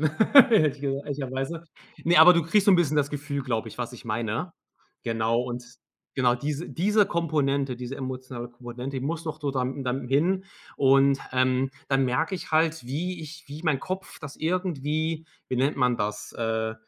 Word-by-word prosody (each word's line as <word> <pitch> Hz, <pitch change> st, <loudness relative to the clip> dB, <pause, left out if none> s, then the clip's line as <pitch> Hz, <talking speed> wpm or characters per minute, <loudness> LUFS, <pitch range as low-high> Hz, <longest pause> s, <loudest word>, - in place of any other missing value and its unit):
hätte 220 Hz, -, +6 dB, 0.2 s
ich -, -, -17 dB
gesagt 140 Hz, 0 st, -2 dB
ehrlicherweise. 140 Hz, +3 st, -4 dB, 0.4 s
Ne, 170 Hz, +1 st, +4 dB
aber 180 Hz, +3 st, +10 dB
du 170 Hz, -1 st, +2 dB
kriegst 195 Hz, +6 st, +2 dB
so 205 Hz, -, +7 dB
'n 185 Hz, -, +7 dB
bisschen 155 Hz, -3 st, +2 dB
das 145 Hz, -1 st, +1 dB
Gefühl, 145 Hz, -1 st, -3 dB
glaube 115 Hz, -3 st, -2 dB
ich, 110 Hz, -, -12 dB
was 120 Hz, 0 st, -3 dB
ich 120 Hz, -, -12 dB
meine. 115 Hz, +9 st, -2 dB, 0.5 s
Genau 115 Hz, +1 st, 0 dB
und 120 Hz, 0 st, -5 dB, 0.5 s
genau, 125 Hz, -2 st, +3 dB
diese 145 Hz, +5 st, -4 dB
diese 205 Hz, +4 st, +2 dB
Komponente 140 Hz, -6 st, 0 dB
diese 125 Hz, +2 st, -6 dB
emotionale 130 Hz, -2 st, -6 dB
Komponente, 125 Hz, +2 st, -6 dB
die 130 Hz, -, -5 dB
muss 165 Hz, +2 st, -3 dB
noch 155 Hz, -1 st, -5 dB
so 145 Hz, -, -1 dB
da 130 Hz, -2 st, -1 dB
dann 130 Hz, 0 st, -3 dB
hin 175 Hz, +8 st, +2 dB, 0.3 s
und, 135 Hz, 0 st, +4 dB
ähm, 130 Hz, +1 st, +2 dB, 0.2 s
dann 135 Hz, -1 st, +2 dB
merke 160 Hz, +9 st, 0 dB
ich 180 Hz, -, -7 dB
halt, 160 Hz, -3 st, +2 dB
wie 170 Hz, +7 st, -3 dB
ich 155 Hz, 0 st, -10 dB
wie 150 Hz, +4 st, -8 dB
mein 150 Hz, -5 st, +1 dB
Kopf 185 Hz, +4 st, -6 dB
das 145 Hz, -2 st, -8 dB
irgendwie, 160 Hz, -2 st, -1 dB, 0.2 s
wie 130 Hz, -, -1 dB
nennt 135 Hz, +4 st, +1 dB
man 125 Hz, -2 st, +2 dB
das, 105 Hz, 0 st, -3 dB
äh, 110 Hz, -1 st, -2 dB
140 Hz, 185 wpm, -26 LUFS, 125-160 Hz, 0.5 s, aber